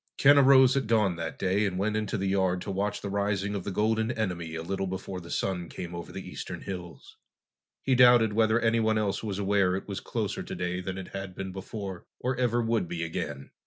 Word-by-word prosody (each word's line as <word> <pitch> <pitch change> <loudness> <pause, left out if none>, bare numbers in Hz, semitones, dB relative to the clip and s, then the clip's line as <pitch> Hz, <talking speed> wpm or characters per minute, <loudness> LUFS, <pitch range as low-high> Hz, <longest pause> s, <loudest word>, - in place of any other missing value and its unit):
Ken 145 +1 +7
arose 135 -1 +7
at 135 -5 0
dawn 105 -5 +3
that - - -4
day 95 +2 +1
and 90 -2 -3
went 105 +3 0
into 110 +1 -1
the 95 - -2
yard 95 -2 +1
to 100 - -4
watch 100 +2 -2
the 100 - -4
rising 100 0 0
of 100 -3 -3
the - - -4
golden 110 +3 +1
enemy 90 -8 -3
a 80 - -4
little 95 +2 -2
before 95 0 -5
the 85 - -11
sun 90 -2 -2
came 90 -1 -7
over 85 0 -7
the - - -7
eastern - - -6
hills. 90 -3 -8 0.7
He 135 - +2
doubted 120 -3 +6
whether 110 +1 +3
anyone 115 -1 +2
else 105 -2 0
was 105 -4 -3
aware 100 -2 +2
it 95 - -5
was 100 -2 -4
closer - - -3
today 90 +1 -3
than 95 +1 -5
it 95 - -7
had 95 -1 -6
been 95 0 -5
before, 95 -1 -7
or 130 +1 -1
ever 120 -1 +1
would 115 -5 0
be 85 0 -3
again. 80 -4 -5
100 Hz, 220 wpm, -28 LUFS, 90-110 Hz, 0.7 s, Ken